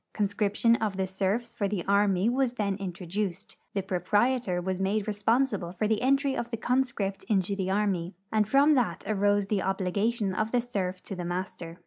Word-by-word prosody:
Conscription 210 +2 +2
of 210 -3 -2
the 190 - +1
serfs 195 +5 -1
for 210 -4 -1
the 195 -3 -3
army 200 -1 +3
Avas 250 0 +1
then 200 -4 0
introduced, 190 0 -4 0.2
the 195 - -1
proprietor 195 +3 +1
Avas 185 +1 -2
made 200 +2 0
responsible 215 -3 0
for 210 +4 -1
the 215 -1 +1
entry 275 +1 +2
of 235 - -3
the 230 - -3
conscript 240 -5 -1
into 200 -2 +1
the 190 -1 -2
army, 190 -3 0 0.2
and 215 -1 +2
from 280 +4 +5
that 250 -5 0
arose 205 -1 +2
the 200 0 0
obli 190 -1 -1
gation 210 -2 0
of 215 +2 -1
the 245 - +3
serf 195 -6 -3
to 195 - -6
the 180 - -5
master. 175 -1 -5
205 Hz, 185 wpm, -28 LUFS, 190-230 Hz, 0.2 s, from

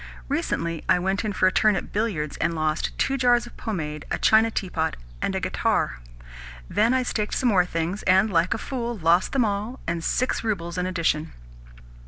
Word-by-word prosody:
Recently 165 -1 -2
I - - +6
went 190 +3 -1
in 215 - -1
for 185 - +1
a 185 - +5
turn 215 +1 +3
at 175 - -5
billiards, 200 -9 -1
and 170 +1 0
lost 155 0 0
two 270 - +1
jars 245 -1 +3
of 240 - -13
pomade, 155 -8 -4
a - - -1
china 220 +1 +4
teapot, 180 -7 -2 0.3
and - - -1
a - - 0
guitar. - - 0 0.7
Then 220 +3 +2
I 260 0 +2
staked 210 -3 -2
some 250 - +2
more 185 -5 +4
things, 170 +4 -2
and, 190 +3 +5
like 170 +5 +2
a - - -3
fool, 240 -1 -4
lost 170 +1 +3
them 260 -4 +2
all, 210 +5 -3
and 170 -1 -2
six 255 +6 0
roubles 180 -5 -2
in 180 - -1
addition. 165 -3 -1
190 Hz, 195 wpm, -24 LUFS, 165-225 Hz, 0.7 s, I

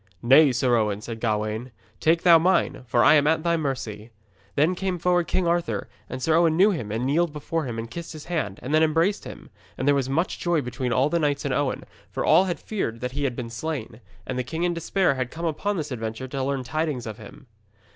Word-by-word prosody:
'Nay, 135 +4 +6
Sir 125 0 +2
Owen,' 105 -2 0
said 115 +1 -7
Gawaine, 110 +2 -2 0.3
'take 165 +1 +2
thou 170 -2 +7
mine, 180 -3 +1
for 120 0 +3
I - - +7
am 145 -1 +4
at 160 0 +2
thy 170 -1 +2
mercy.' 125 -8 -4 0.5
Then 155 +5 +3
came 185 0 -2
forward 175 0 +1
King 185 - 0
Arthur, 170 -11 -1 0.2
and 130 0 -6
Sir 160 - +2
Owen 165 -1 +3
knew 200 +4 +6
him 120 - -4
and 115 +3 -2
kneeled 160 +4 +1
before 155 +2 -3
him 120 -3 -5
and 115 0 -4
kissed 170 +8 -7
his 155 -1 -10
hand, 150 - -2
and 135 - -3
then 155 - +5
embraced 165 +5 +1
him. - - -10 0.3
And 130 - -2
there 145 - +6
was 135 -2 0
much 165 +7 -1
joy 175 -3 +1
between 125 0 -3
all 130 +4 +2
the 170 - +1
knights 145 -2 0
and 140 - 0
Owen, 140 0 -1 0.3
for - - -3
all 190 - +5
had 175 -2 -3
feared 150 - -3
that 125 0 -3
he 140 +2 -2
had 125 -3 -1
been 120 -2 -6
slain, 120 -2 -5 0.2
and 130 0 -3
the - - 0
king 160 +7 -4
in 175 0 +1
despair 170 0 +1
had 130 -2 -3
come 165 +4 -6
upon 195 +6 -1
this 150 -3 -4
adventure 115 +1 -4
to 135 0 -3
learn 135 -1 -1
tidings 155 -3 -2
of 110 -2 -7
him. 105 - -13
145 Hz, 235 wpm, -24 LUFS, 120-165 Hz, 0.5 s, thou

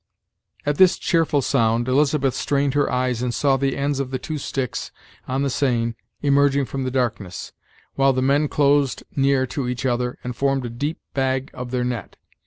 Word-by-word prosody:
At 145 0 0
this 185 -1 +6
cheerful 160 -5 +1
sound, 115 -2 +2
Elizabeth 140 0 +2
strained 140 -1 0
her 145 - +1
eyes 125 -1 0
and 125 -1 0
saw 135 +2 +2
the 135 0 0
ends 140 0 0
of 135 -2 -2
the 130 - -2
two 155 +3 -5
sticks 135 -2 -3 0.4
on 130 +2 -1
the 140 - +1
seine 120 -4 +1 0.3
emerging 140 -1 +3
from 135 0 -4
the - - 0
darkness, 115 -8 -2 0.4
while 135 0 +3
the 130 0 0
men 140 +3 +3
closed 140 -2 +2
near 135 -1 +3
to 130 0 -3
each 125 +1 -3
other, 125 -1 0
and 125 -1 -4
formed 135 0 0
a 120 - -5
deep 145 +7 -3 0.2
bag 130 0 0
of 125 0 -6
their 125 0 -1
net. 120 -5 -4
135 Hz, 190 wpm, -22 LUFS, 125-140 Hz, 0.4 s, this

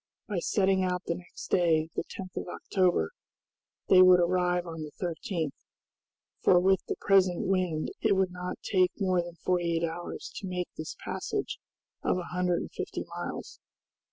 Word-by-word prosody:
By 205 -5 -1
setting 190 +1 +2
out 180 0 -1
the - - 0
next 175 0 -10
day, 160 -3 +3
the - - -1
10th 185 -2 -9
of - - -4
October, 180 - +1 0.8
they 185 - +8
would 185 -1 +8
arrive 180 0 +2
on 165 -2 -6
the 150 -1 -6
13th, 165 -2 -2 0.9
for 180 - +6
with 190 +1 +3
the - - -1
present 185 -3 +3
wind 180 -5 0
it 220 -3 +4
would 190 -1 +2
not 180 0 -5
take 185 -2 +3
more 185 -3 +2
than 170 0 -8
forty 175 -1 0
eight 165 - -1
hours 165 +1 -4
to 195 - -5
make 180 -1 -3
this 155 - -6
passage - - -3 0.4
of - - +1
a 180 -1 -6
hundred 180 -1 +1
and - - -7
fifty - - -4
miles. - - -6
180 Hz, 170 wpm, -29 LUFS, 170-185 Hz, 0.9 s, they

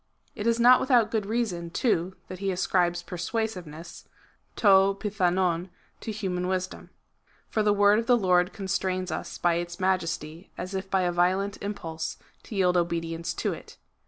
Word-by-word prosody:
It 215 0 -3
is 230 0 +2
not 250 +2 +7
without 240 -5 +3
good 215 -3 -1
reason, 205 -7 -2
too, 185 -2 0
that 185 0 -8
he 195 0 -1
ascribes 175 -1 +1
persuasiveness 180 -4 -5 0.5
{to - - -5
jnOavovY 190 -3 +3 0.3
to 225 - -5
human 185 -4 -2
wisdom. 185 0 -3 0.6
For - - -2
i;he 210 -1 +3
word 205 +1 +5
of 230 - -4
the 245 - +5
Lord 180 -4 +3
constrains 190 -2 -2
us - - -5
by 170 -1 +2
its 175 +1 -5
majesty, 170 -3 -2
as 185 - -5
if 190 0 -4
by 190 -1 +2
a 180 -1 +1
violent 185 +3 +1
impulse, 165 -6 -4 0.3
to 220 - -8
yield 180 -2 +3
obedience 165 -1 -1
to - - -1
it. - - -12
185 Hz, 160 wpm, -27 LUFS, 175-205 Hz, 0.6 s, not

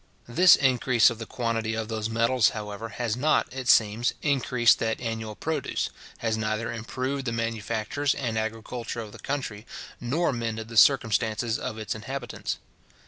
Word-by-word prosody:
This 180 +10 +7
increase 125 -3 +4
of 115 - -7
the 115 - -6
quantity 115 -2 -2
of 110 -1 -3
those 110 -1 -3
metals, 115 +1 +3
however, 105 +1 -6
has 115 -2 -2
not, 150 +5 +2
it 130 -1 -5
seems, 110 +1 +4
increased 125 -4 +3
that 110 -1 -1
annual 110 -2 -4
produce, 155 0 -2 0.3
has 115 -1 -1
neither 110 +1 -2
improved 130 +4 -3
the 115 - -1
manufactures 115 +4 -1
and 120 -5 -2
agriculture 115 +2 -4
of 110 -2 -8
the - - -12
country, 130 -7 -4 0.4
nor 140 +6 0
mended 115 -2 -3
the 115 - -8
circumstances 115 -3 +3
of 110 - -4
its 110 -1 -3
inhabitants. 120 +2 -5
115 Hz, 155 wpm, -26 LUFS, 110-125 Hz, 0.4 s, This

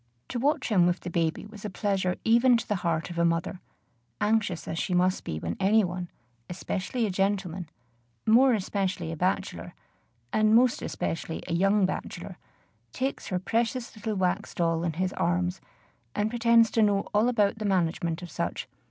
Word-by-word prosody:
To 245 - -3
watch 285 +2 +1
him 180 -5 +4
with 175 +1 0
the 175 - -6
baby 165 +1 -1
was 210 -1 -12
a 210 - -3
pleasure 190 -2 0
even 235 +2 +5
to 230 - -5
the 210 - 0
heart 170 -1 -1
of 170 - -4
a - - +3
mother, 170 +2 0 0.6
anxious 210 -5 0
as 165 - -3
she 180 - -1
must 185 +1 +2
be 80 - -4
when 85 +2 -3
any 215 +3 +4
one, 180 -1 -4 0.4
especially 195 +6 -2
a 205 - -1
gentleman, 190 -3 -1 0.6
more 250 +4 +6
especially 190 -4 -2
a - - -4
bachelor, 150 - -2 0.6
and 215 0 +4
most 245 0 +4
especially 165 0 -4
a - - -2
young 195 +3 +3
bachelor, - - -5 0.5
takes 265 +1 -3
her 185 - -1
precious 230 +6 -1
little 215 0 -3
wax 185 -2 -1
doll 165 -1 +1
in 170 -2 -1
his 185 +3 -1
arms, 90 0 0 0.5
and 210 +1 0
pretends 230 -2 +4
to 225 - +2
know 205 -2 +3
all 215 +4 +3
about 215 -3 +1
the 215 - -3
management 170 -2 0
of 175 - -8
such. - - -3
190 Hz, 180 wpm, -27 LUFS, 175-220 Hz, 0.6 s, more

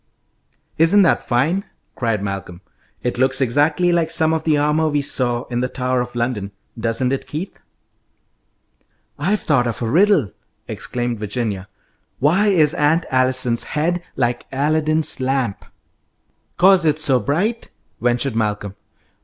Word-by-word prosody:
"Isn't 185 +5 +5
that 175 - +2
fine!" 150 +11 0 0.3
cried 115 -4 -2
Malcolm. 95 -3 -6 0.4
"It 125 0 -2
looks 130 0 +3
exactly 145 +7 +2
like 170 -2 +1
some 160 -1 +3
of 160 -1 -1
the 155 -2 +3
armour 150 +2 +1
we 145 -1 0
saw 120 -3 -1
in 120 -1 -4
the 125 +1 -1
Tower 125 -1 -1
of 125 0 -6
London, 115 -5 -2 0.2
doesn't 115 +3 -1
it, 135 - -4
Keith?" 165 +6 -6 1.6
"I've 195 +8 0
thought 125 -6 +1
of 115 - -3
a 115 - -2
riddle!" 165 - +3 0.4
exclaimed 120 -2 -3
Virginia. 105 -2 -3 0.5
"Why 175 +10 +2
is 160 -6 +3
Aunt 160 +1 +1
Allison's 130 -2 +2
head 170 +4 -1
like 120 -1 -1
Aladdin's 155 +3 +1
lamp?" 130 -5 -2 0.9
"'Cause 190 -1 +5
it's 155 -1 +2
so 135 -5 +4
bright?" 185 - -1 0.3
ventured 120 +1 0
Malcolm. 105 -3 -2
135 Hz, 135 wpm, -19 LUFS, 120-160 Hz, 1.6 s, Isn't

